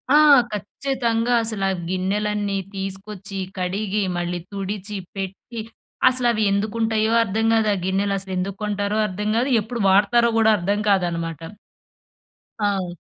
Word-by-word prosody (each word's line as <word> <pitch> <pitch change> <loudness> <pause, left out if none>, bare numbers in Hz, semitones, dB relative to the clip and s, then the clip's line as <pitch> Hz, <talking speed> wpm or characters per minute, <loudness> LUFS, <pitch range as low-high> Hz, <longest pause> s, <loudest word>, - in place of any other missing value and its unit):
ఆ! 300 - +8 0.3
ఖచ్చితంగా 235 +2 -1
అసల 220 -3 -1
ఆ - - -2
గిన్నెలన్నీ 200 +2 -1 0.2
తీసుకొచ్చి, 195 +1 -6 0.2
కడిగి, 200 +3 -1
మళ్ళీ 175 0 -2
తుడిచి, 200 +1 -4 0.2
పెట్టి 195 +4 -6 0.5
అసలవి 240 -4 +2
ఎందుకుంటాయో 220 +2 0
అర్థం 220 +1 -1
గాదు. 220 -1 +3
ఆ - - -3
గిన్నెలసలు 195 0 -1
ఎందుకు 190 +2 -3
కొంటారో 205 0 -1
అర్థం 210 +2 -3
గాదు. 250 +4 +1
ఎప్పుడు 230 +2 -5
వాడతారో 210 +5 +4
గూడా 220 -1 +5
అర్థం 200 +3 0
కాదనమాట. 170 -5 0 1.2
ఆ! 195 -4 -1
205 Hz, 120 wpm, -22 LUFS, 190-220 Hz, 1.2 s, ఆ